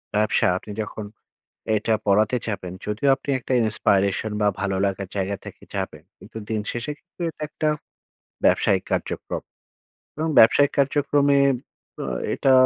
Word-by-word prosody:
ব্যবসা 105 0 +3
আপনি 105 - -9
যখন, 110 0 -6 0.7
এটা 110 +1 +1
পড়াতে 105 +4 +4
চাপেন 95 -4 -4
যদিও 105 +7 0
আপনি 135 +2 -10
একটা 130 - -3
inspiration 100 -1 +1
বা 105 - +4
ভালো 100 -1 0
লাগার 100 0 -2
জায়গা 100 0 -1
থেকে - - -10
যাবেন - - -4
কিন্তু - - -11
দিন 110 -1 0
শেষে 120 +5 -3
কিন্তু 175 0 -16
এটা 160 - -12
একটা 155 0 -1 0.8
ব্যবসায়িক - - +3
কার্যক্রম, - - -2 0.8
এবং 160 +2 -1
ব্যবসায়িক 145 +5 +6
কার্যক্রমে 140 0 +3 0.6
ব - - -39 0.4
এটা 135 - +3
110 Hz, 135 wpm, -23 LUFS, 100-140 Hz, 0.8 s, ব্যবসায়িক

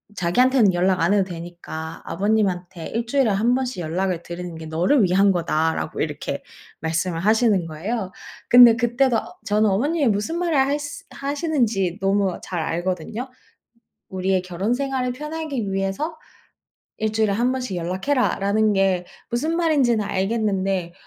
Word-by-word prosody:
자기한테는 220 +4 +3
연락 185 +1 +2
안 170 +4 +3
해도 205 -1 +3
되니까 170 -2 -7
아버님한테 190 -5 -1
1 230 +1 -3
주일에 265 -3 +2
1 225 +5 +2
번씩 255 -7 -2
연락을 175 +2 -1
드리는게 170 -2 -7
너를 180 - +2
위한거다."라고 175 -4 +1
이렇게 - - -3 0.4
말씀을 165 +2 -1
하시는 215 -1 +3
거예요. 190 +6 -4 0.4
근데 245 -2 +9
그때도 240 +1 +2 0.3
저는 210 +1 +2
어머님이 285 - +1
무슨 210 +11 -1
말을 345 -2 0
할스 290 +2 -1
하시는지 260 - -1
너무 195 -1 +1
잘 180 - -4
알거든요. 180 +8 -3 0.8
"우리의 190 0 0
결혼생활을 250 +8 -1
편하기 295 -7 -4
위해서 195 - -2 0.8
1 220 0 -1
주일에 220 -2 +2
1 240 +5 +1
번씩 255 -8 -3
연락해라."라는 205 +2 +1
게 190 -2 +1 0.2
무슨 300 +8 -1
말인지는 280 -10 +2
알겠는데 195 -3 -1
205 Hz, 325 characters per minute, -22 LUFS, 180-250 Hz, 0.8 s, 근데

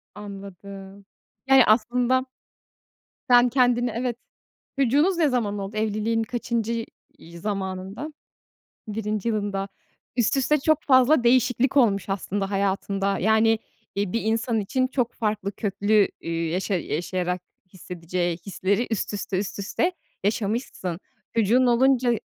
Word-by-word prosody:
Anladım. 200 -1 -10 0.4
Yani, 270 -2 +7
aslında 245 +3 +2 1.0
Sen 245 0 +6
kendini 245 -1 +2
Evet, 240 -1 -2 0.6
çocuğunuz 290 +8 +3
ne 315 -4 +3
zaman 210 -5 -1
oldu? 200 +2 -5
Evliliğin 220 +1 0
kaçıncı 235 -1 -2 0.3
y 170 +1 -12
zamanında? 195 - -4 0.8
1. 215 0 -2
yılında. 205 -2 -2 0.5
Üst 240 +2 +2
üste 300 +3 +2
çok 310 +1 +2
fazla 260 0 +5
değişiklik 250 +2 +3
olmuş 200 -6 +3
aslında 195 0 -2
hayatında. 195 0 0
Yani, 220 +2 +3 0.4
iii, 200 -2 -1
bir 230 - 0
insan 225 +1 0
için 255 +6 0
çok 250 -2 -1
farklı, 210 -2 -2
köklü, 205 0 +2
üüü, 165 0 -2
yaşa 190 +3 -1
yaşayarak 180 +1 -2 0.3
hissedeceği 175 -1 -3
hisleri 200 +4 0
üst 220 -1 -2
üste, 200 -2 -2
üst 200 +1 -4
üste 270 - 0 0.3
yaşamışsın. 205 -4 -2 0.4
Çocuğun 235 +4 +4
olunca 250 0 +3
215 Hz, 120 wpm, -24 LUFS, 195-245 Hz, 1.0 s, Yani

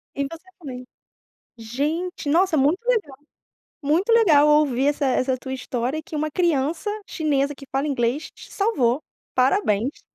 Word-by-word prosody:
E 280 - -1
você 330 +6 -8
também. 255 -5 -8 0.7
Gente, 290 +9 -3
nossa, 340 +2 +3
muito 295 +7 +3
legal, 400 - 0 0.6
muito 325 +10 +1
legal 330 -11 +6
ouvir 290 -3 +3
essa 290 -1 +1
essa 255 0 +1
tua 260 +1 -6
história, 255 +3 -3
que 310 - -9
uma 305 0 -1
criança 335 +2 0 0.2
chinesa, 290 -2 0
que 275 - -12
fala 270 +3 0
inglês 265 +2 -1
te - - -15
salvou, 290 - +1 0.3
parabéns. 255 - +1
290 Hz, 140 wpm, -23 LUFS, 265-325 Hz, 0.7 s, legal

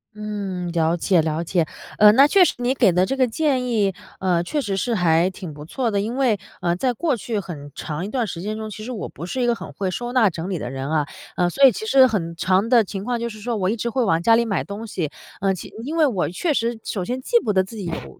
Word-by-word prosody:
嗯， 200 -4 -4
了 165 0 +1
解， 175 0 +3
了 160 +1 -1
解。 170 -2 0 0.3
呃， 210 0 +9
那 270 +5 +7
确 365 +6 +5
实 - - +2
你 245 +2 0
给 235 -8 +4
的 180 +2 +3
这 270 - -2
个 260 -1 +3
建 255 0 0
议， 205 -5 +1 0.3
呃， 180 -2 +1
确 295 - -2
实 205 -8 -2
是 230 +5 0
还 175 -1 +3
挺 185 -4 -8
不 145 0 -10
错 235 - -2
的。 200 -1 +1
因 225 +4 -3
为， 240 -7 +2 0.2
呃， 175 -1 +1
在 245 +7 0
过 300 +2 0
去 225 -1 -3
很 145 -7 -8
长 155 +2 -4
一 200 - -4
段 245 0 0
时 175 -5 -6
间 215 +3 -3
中， 220 0 -6
其 215 +1 -8
实 245 - -5
我 230 - -4
不 170 - -8
是 260 - -3
一 245 - +2
个 240 - +3
很 230 - -8
会 190 -2 -3
收 240 +5 -4
纳 245 -4 +4
整 165 +4 -5
理 185 - -2
的 125 -5 -5
人 135 +1 -4
啊。 155 -2 +1 0.3
呃， 180 - +2
所 275 - 0
以 270 - +9
其 220 - -6
实 260 +2 +6
很 170 -8 -2
常 185 +5 +1
的 235 -2 +6
情 195 -1 -6
况 240 +1 -1
就 235 0 -2
是 215 - -10
说 230 +2 -2
我 190 -3 0
一 220 - 0
直 235 +1 -3
会 255 +1 +1
往 165 -7 +2
家 230 0 +6
里 235 - +2
买 200 -6 -1
东 210 +3 -7
西， 165 -7 -3 0.3
呃， 195 0 +2
其 185 - -8
因 300 +6 -4
为 320 -2 +4
我 195 - 0
确 305 - -1
实 230 0 -1
首 185 -4 -3
先 255 +1 -3
记 475 - +3
不 210 - -1
得 190 -1 +3
自 190 +5 -11
己 195 - -5
有 70 - -6
210 Hz, 305 characters per minute, -22 LUFS, 180-240 Hz, 0.3 s, 呃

